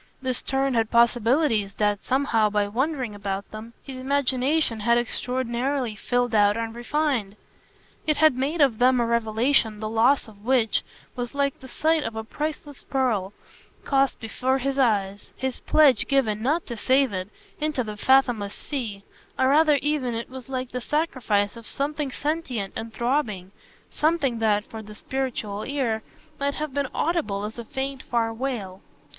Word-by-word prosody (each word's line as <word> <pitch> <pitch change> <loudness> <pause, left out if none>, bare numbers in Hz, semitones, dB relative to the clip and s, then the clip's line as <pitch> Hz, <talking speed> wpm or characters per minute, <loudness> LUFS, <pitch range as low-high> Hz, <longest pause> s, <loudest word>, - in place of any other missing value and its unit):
This 255 -2 -2
turn 270 0 0
had 225 -2 +1
possibilities 235 -2 +3
that, 205 -1 +1
somehow, 250 -5 +2
by 205 0 +1
wondering 255 +1 -1
about 200 -1 -4
them, 220 +2 -9
his 270 -2 -8
imagination 265 -1 +1
had 235 +3 +3
extraordinarily 250 0 -1
filled 245 +3 0
out 205 0 +4
and 225 0 -3
refined. 240 -4 -1 0.7
It 305 - +2
had 310 -3 +5
made 285 +6 -1
of 260 -6 +4
them 255 0 +5
a 235 - +2
revelation 230 0 +2
the 215 - -3
loss 230 +6 +3
of 205 -2 -16
which 240 -2 +2 0.3
was 245 +1 -4
like 280 -1 0
the 260 - -11
sight 315 +5 +1
of 225 - -4
a 220 - -3
priceless 295 +3 -5
pearl 230 -8 0 0.5
cast 275 -1 +2
before 255 +4 0
his 275 +1 -1
eyes 205 -5 +1
his 260 -1 -3
pledge 295 -4 +4
given 225 -7 +1
not 300 +8 +1
to 235 - -5
save 260 +1 +2
it 185 +1 -3 0.3
into 300 -4 0
the 215 -2 -6
fathomless 240 -4 +3
sea, 225 -9 -5 0.3
or 260 - +3
rather 300 +1 +5
even 285 -5 0
it 230 +2 -5
was 260 -1 -9
like 255 -1 -3
the 250 - -3
sacrifice 240 -9 0
of 230 -1 -10
something 290 +1 -2
sentient 265 -10 -2
and 225 0 -5
throbbing, 220 -6 -1 0.4
something 295 -7 +1
that, 210 -1 +2
for 220 - -8
the 210 0 -11
spiritual 230 -6 -3
ear, 255 -6 -1 0.4
might 280 0 0
have 305 -3 -4
been 280 -2 -1
audible 300 - -1
as 220 +3 -7
a - - -4
faint 265 +2 -4
far 230 -1 0
wail. 225 -7 -4
245 Hz, 165 wpm, -25 LUFS, 220-275 Hz, 0.7 s, had